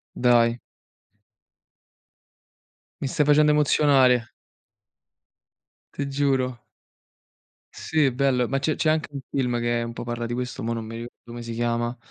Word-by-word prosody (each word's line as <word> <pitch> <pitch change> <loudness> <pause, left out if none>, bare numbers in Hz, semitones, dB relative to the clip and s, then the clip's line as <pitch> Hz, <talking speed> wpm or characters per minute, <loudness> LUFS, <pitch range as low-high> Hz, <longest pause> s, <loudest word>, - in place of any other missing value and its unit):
Dai. 120 -1 +3 2.4
Mi - - -1
stai 145 +2 +1
facendo 150 +1 +5
emozionare. 135 -5 +3 1.6
Ti 140 - -3
giuro. 135 -3 0 1.1
Sì, 150 -4 +1
bello, 125 -1 +1
ma 135 - -1
c'è 150 +3 0
c'è 155 - +1
anche 155 0 0
un 140 - -4
film 125 -3 -1
che 120 0 0
un 115 - -6
po' - - -6
parla 120 0 -4
di 120 - -4
questo, 125 +1 -4
mò 115 +1 -1
non 115 -1 -5
mi 115 +1 -8
ricordo 120 +1 -9
come 120 0 -8
si 115 - -6
chiama. 120 +1 -1
125 Hz, 140 wpm, -24 LUFS, 120-140 Hz, 2.4 s, facendo